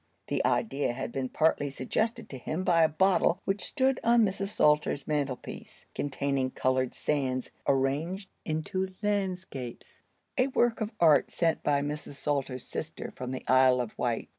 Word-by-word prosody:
The - - 0
idea 145 - +1
had 120 -2 -4
been 130 0 -3
partly 155 -1 +2
suggested 180 - -2
to 130 - -7
him 160 +8 -3
by 170 -2 +4
a 160 - +6
bottle 180 +2 +3
which 195 +1 -1
stood 265 -2 +1
on 235 -1 +5
Mrs. 195 0 -2
Salter's 150 -6 +2
mantelpiece, 145 -4 -4
containing 140 -2 -1
colored 130 0 0
sands 130 -4 -1 0.2
arranged 150 +9 0
into 185 +4 -2
landscapes; 185 - -3 0.4
a 255 - +4
work 240 -3 +1
of 215 0 -1
art 155 -4 +5
sent 165 -2 0
by 145 -1 +1
Mrs. 150 0 -5
Salter's 140 -3 -2
sister - - -5
from 125 - -5
the 130 0 -5
Isle 130 -1 +5
of 120 -3 -3
Wight. 120 -2 -2
150 Hz, 155 wpm, -29 LUFS, 130-190 Hz, 0.4 s, a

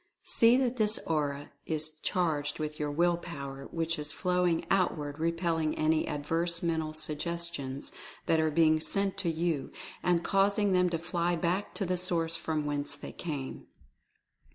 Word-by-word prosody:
See 235 +2 +5
that 255 -1 +1
this 215 -1 +3
Aura 145 -2 -1 0.2
is 155 -1 -2
charged 150 -5 0
with 155 -1 -4
your 150 -1 -1
Will 170 +3 +2
Power, 140 -5 -7
which 165 -1 -1
is 150 0 -4
flowing 180 -2 +1
outward 155 -6 +1
repelling 165 -1 0
any 155 0 +2
adverse 165 +3 -1
mental 160 -2 0
suggestions 155 -3 -3 0.3
that 160 - +3
are 160 0 +3
being 155 0 +4
sent 195 +4 +1
to 175 - +1
you, 160 -3 -1 0.3
and 175 -1 +2
causing 200 +2 +3
them 180 -1 +4
to 170 - 0
fly 175 +1 0
back 175 +4 -1
to 200 - -1
the 180 0 0
source 170 -2 0
from 155 -2 -2
whence 145 0 -2
they 145 - -8
came. 145 -6 -5
165 Hz, 155 wpm, -30 LUFS, 150-175 Hz, 0.3 s, See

